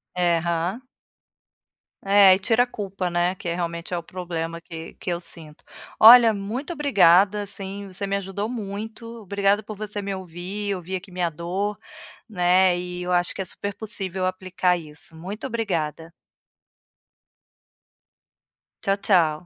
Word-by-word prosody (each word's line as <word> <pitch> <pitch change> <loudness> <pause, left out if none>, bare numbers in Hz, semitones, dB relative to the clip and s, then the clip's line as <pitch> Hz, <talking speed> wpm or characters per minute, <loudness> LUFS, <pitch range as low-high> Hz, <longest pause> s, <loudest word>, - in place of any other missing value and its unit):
É, 175 -2 +2
Hã. 170 +7 -2 1.2
É, 195 -1 +7
e 185 - +1
tira 225 +5 +3
a 245 - -5
culpa, 195 -5 -4
né, 175 +2 +1
que 175 - -8
realmente 170 0 -4
é - - 0
o - - -3
problema 170 -1 -5
que 165 -1 -9
que - - -16
eu 170 - -1
sinto. 160 -3 -8 0.4
Olha, 230 0 +10
muito 230 - -4
obrigada, 205 - +4
assim, 200 0 -7
você 195 +1 -5
me 200 - 0
ajudou 200 +2 -3
muito, 225 +1 -6
obrigada 200 +1 +1
por 215 -2 -9
você 210 0 -4
me 200 0 -3
ouvir, 190 +3 -4
ouvir 185 +1 -5
aqui 190 +1 -7
minha 180 -1 -1
dor, 185 +6 -3 0.5
né, 180 -2 +3
e 180 0 -5
eu 180 - -3
acho 175 0 +2
que - - -3
é 190 - -3
super 205 +2 -5
possível 195 -4 -3
aplicar 185 -1 0
isso, 160 -1 -8
muito 195 +9 -7
obrigada. 170 - -3 2.7
Tchau, 195 0 +2
tchau. 175 -5 +2
190 Hz, 150 wpm, -24 LUFS, 175-205 Hz, 2.7 s, Olha